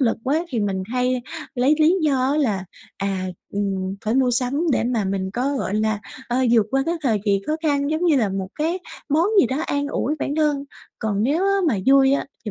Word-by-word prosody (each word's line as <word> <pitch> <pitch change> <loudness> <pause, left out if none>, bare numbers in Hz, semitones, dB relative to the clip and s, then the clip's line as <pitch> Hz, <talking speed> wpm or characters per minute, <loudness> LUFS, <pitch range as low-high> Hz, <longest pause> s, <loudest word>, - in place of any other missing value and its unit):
lực 235 -4 +2
quá 300 +6 +1
thì 240 -7 -2
mình 195 -2 -1
hay 250 0 0 0.3
lấy 260 +4 +3
lý 320 +4 +5
do 270 -3 +2
á - - 0
là, 215 -11 0 0.3
à, 195 -1 -2 0.3
ừm, 195 -2 -2
phải 220 +2 0
mua 260 -1 +3
sắm 255 +7 0
để - - +1
mà 235 -3 0
mình 190 0 -2
có, 265 +6 -1
gọi 200 - -2
là, 215 -1 0 0.3
ờ, 240 - 0 0.2
vượt 225 -3 +4
qua 270 +1 +2
cái 335 - +1
thời 230 -6 +2
kỳ 200 -2 +2
khó 310 +1 0
khăn, 285 -2 +1
giống 315 +3 0
như 325 -4 +4
là 225 -6 +2
một 190 -1 -3
cái 330 +4 -1 0.3
món 310 +4 +3
gì - - +3
đó 260 +3 -2
an 285 0 -1
ủi 300 - -1
bản 285 - -2
thân, 295 -2 +1 0.3
còn 210 -2 -1
nếu 300 - +1
á 395 - +3 0.2
mà 270 - +2
vui 270 0 +6
á 280 - +1 0.2
thì 215 - -3
255 Hz, 230 wpm, -22 LUFS, 210-290 Hz, 0.3 s, vui